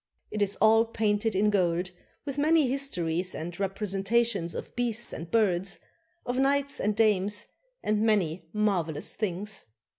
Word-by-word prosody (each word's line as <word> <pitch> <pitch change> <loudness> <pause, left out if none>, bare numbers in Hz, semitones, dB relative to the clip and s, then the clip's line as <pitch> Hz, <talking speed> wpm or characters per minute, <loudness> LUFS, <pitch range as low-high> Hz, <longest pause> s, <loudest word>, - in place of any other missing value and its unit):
It 210 - -3
is 205 0 +2
all 225 +2 +5
painted 220 -1 0
in 210 +2 +3
gold, 180 -2 +1 0.3
with 280 -1 -3
many 310 -1 +4
histories 180 -10 -1
and 170 +3 -6
representations 195 0 0
of - - -7
beasts 235 -1 -1
and 165 +1 -6
birds, 195 -4 +1 0.5
of 245 +1 -1
knights 280 +1 +1
and 210 0 0
dames, 205 -2 +2 0.4
and 210 0 +1
many 185 -7 +1
marvelous 180 -8 0
things. 205 0 -4
210 Hz, 140 wpm, -28 LUFS, 185-230 Hz, 0.5 s, all